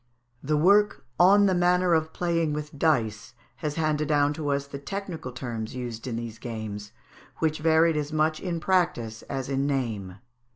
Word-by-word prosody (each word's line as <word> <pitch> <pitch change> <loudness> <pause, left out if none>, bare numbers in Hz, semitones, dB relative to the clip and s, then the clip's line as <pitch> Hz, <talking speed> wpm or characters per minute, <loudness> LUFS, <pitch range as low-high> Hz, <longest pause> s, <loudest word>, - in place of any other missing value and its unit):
] 120 0 -37
The 150 - +4
work 200 +6 +4
"On 200 +3 +7
the 190 - +3
Manner 180 0 +3
of 160 -1 +1
playing 165 -3 0
with 150 0 -5
Dice," 115 -10 0 0.2
has 150 -3 -3
handed 155 -2 0
down 145 -1 +3
to 150 -1 -3
us 140 0 0
the 140 0 -8
technical 170 -3 -5
terms 120 -2 -5
used 120 -2 -5
in 120 - -3
these 115 -1 -6
games, 110 -3 -6 0.5
which 155 -1 0
varied 160 +1 +4
as 150 0 -2
much 155 0 +1
in 175 -3 -3
practice 160 -12 0
as 135 -2 -5
in 135 0 0
name. 110 -10 -2
150 Hz, 175 wpm, -26 LUFS, 120-165 Hz, 0.5 s, On